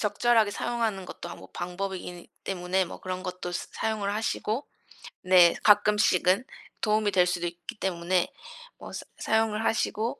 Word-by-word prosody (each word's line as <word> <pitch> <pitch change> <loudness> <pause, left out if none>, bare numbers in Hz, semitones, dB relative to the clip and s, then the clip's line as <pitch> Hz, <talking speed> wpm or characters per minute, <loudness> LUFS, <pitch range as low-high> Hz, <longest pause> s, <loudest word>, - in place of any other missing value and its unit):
...적절하게 220 0 +3
사용하는 225 -5 -1
것도 175 - -8
뭐 - - -13
방법이기는 180 -1 -5 0.2
때문에 185 0 0
뭐 170 - -9
그런 185 0 -5
것도 180 -1 -4
사 175 - -4
사용을 210 -2 -1
하시고 220 +3 -1 0.6
네 180 -2 +6
가끔씩은 205 -1 +4 0.4
도움이 215 -1 +2
될 185 -2 +4
수도 175 -1 -1
있기 175 +5 -8
때문에 180 -1 0 0.5
뭐 - - -10
사 - - -6
사용을 220 -1 +1
하시고 225 +3 0
195 Hz, 325 characters per minute, -27 LUFS, 180-215 Hz, 0.6 s, 네